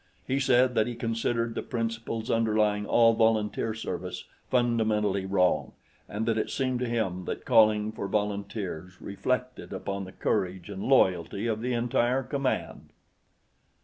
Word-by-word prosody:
He 135 +1 0
said 130 -1 +4
that 110 -1 +2
he 120 - -4
considered 115 0 -1
the - - -3
principles 115 -1 -3
underlying 105 -2 +1
all 115 -1 +5
volunteer 110 -1 +1
service 115 - -5 0.3
fundamentally 110 -5 +1
wrong, 90 -2 +1 0.4
and 110 +2 -3
that 115 -1 +1
it - - -2
seemed 130 -2 -1
to 125 -1 -2
him 95 -6 -1
that - - -5
calling 110 -1 +4
for 105 -2 -5
volunteers 100 -3 -3
reflected 125 +5 -3
upon 100 0 -4
the 95 - -10
courage 95 -2 -2
and 95 -1 -6
loyalty 100 -4 +2
of 110 -2 -1
the 125 +1 -1
entire 120 +2 +1
command. 135 0 -3
110 Hz, 145 wpm, -28 LUFS, 100-120 Hz, 0.4 s, all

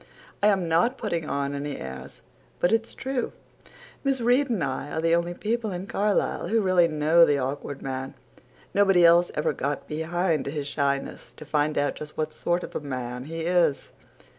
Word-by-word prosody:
"I 205 - +5
am 190 -4 +2
not 175 +11 +2
putting 170 -8 -3
on 140 0 -1
any 140 0 -4
airs. 65 0 -9 0.4
But 175 - +2
it's 225 0 0
true. 265 -2 -3 0.7
Miss 270 -2 +1
Reade 250 +4 +3
and 215 -9 0
I 130 +2 -3
are 160 - -3
the 165 +1 +2
only 170 +1 +1
people 220 +2 -2
in 180 +1 -4
Carlisle 205 +1 0
who 225 - +2
really 185 -4 +4
know 155 +2 +4
the 145 -3 +4
Awkward 135 +1 -4
Man. 130 0 -4 0.6
Nobody 195 -3 +5
else 170 +1 +6
ever 150 - 0
got 140 +1 -3
behind 160 -1 -1
his 145 0 -3
shyness 140 -1 -2
to 155 - -11
find 150 +1 0
out 145 0 0
just 150 0 -9
what 155 0 -2
sort 175 +1 -1
of - - -9
a - - 0
man 125 -3 -5
he 165 +2 -5
is." 170 -4 +1
165 Hz, 185 wpm, -26 LUFS, 145-190 Hz, 0.7 s, else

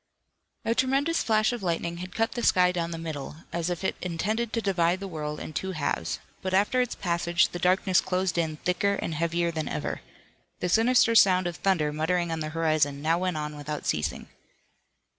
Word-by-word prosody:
A 230 - +2
tremendous 275 +7 +1
flash 215 +1 +2
of 240 - -4
lightning 170 -1 -2
had 180 +1 -8
cut 225 0 +1
the 240 - -4
sky 180 -5 +4
down 170 -2 -2
the 165 - -5
middle, 155 -4 -6 0.2
as 170 0 -1
if 175 +1 -3
it - - 0
intended 210 +7 -1
to 230 - 0
divide 185 -4 +1
the 195 - -5
world 150 -3 -4
in 155 - -7
two 190 +3 -3
halves, 145 - -2 0.2
but 185 0 -1
after 210 +6 +3
its 250 - -2
passage 170 -1 +1
the 175 - -6
darkness 185 +1 +3
closed 185 -1 -1
in 160 -2 -1
thicker 180 +5 0
and 165 - -3
heavier 170 +2 0
than 160 -2 -3
ever. - - -3 0.6
The 180 - -1
sinister 230 +4 +4
sound 185 -4 +5
of 175 -1 -3
thunder 160 -7 +1
muttering 170 +2 0
on 165 - -2
the 155 -1 -3
horizon 155 -3 +1
now 165 +2 +2
went 180 -3 -1
on 150 0 -4
without 150 0 -5
ceasing. 75 -1 -1
175 Hz, 200 wpm, -27 LUFS, 160-195 Hz, 0.6 s, sound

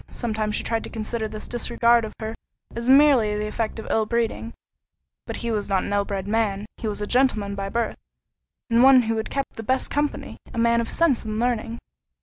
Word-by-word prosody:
Sometimes 215 -3 -2
she - - -2
tried 225 -1 -1
to - - -8
consider 220 0 -3
this 215 0 -7
disregard 235 -1 +2
of 215 - -9
her 220 0 -4 0.4
as 235 +2 -2
merely 265 -7 +5
the 210 - -2
effect 220 +1 -3
of 220 - -6
ill 220 -1 +1
breeding; 230 0 -1 0.8
but - - -3
he 235 - 0
was 210 -1 -2
not 190 -2 +1
an - - -3
ill 200 0 +1
bred 195 -1 -4
man: 210 -2 0
he 225 - -4
was 210 0 -3
a - - -1
gentleman 220 -4 +1
by 195 0 -4
birth, 230 +1 -2 0.7
and 235 0 +3
one 260 -1 +7
who 225 0 -1
had 220 - -3
kept 275 -1 -4
the - - -4
best 260 +4 -1
company—a 290 -4 -3
man 235 0 +3
of 230 - -4
sense 330 -8 +2
and 215 -1 -3
learning. 235 -1 -1
225 Hz, 210 wpm, -24 LUFS, 210-235 Hz, 0.8 s, one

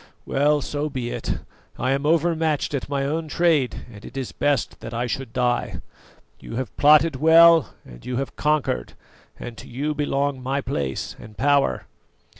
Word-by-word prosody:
Well, 145 +2 +2
so 145 +2 -3
be 125 -4 -4
it; - - -3 0.4
I 130 - 0
am 140 +2 0
overmatched 160 -2 +1
at 140 -1 -3
my 140 -1 -1
own 160 +3 -2
trade, 155 -5 +1
and 105 - -12
it 130 - -10
is 130 -3 -4
best 145 -5 -1
that 115 0 -7
I 120 +1 -1
should 125 0 -4
die. 125 0 -1 0.6
You - - -8
have 125 -3 -4
plotted 150 0 +5
well 165 +1 +6
and - - -13
you 125 - -4
have 135 +1 -4
conquered, 150 - 0 0.5
and 120 - -7
to - - -11
you 145 +5 -2
belong 140 -2 -1
my 135 +2 -1
place 70 - -3
and 105 -1 -13
power." 140 - +2
140 Hz, 170 wpm, -23 LUFS, 125-150 Hz, 0.6 s, well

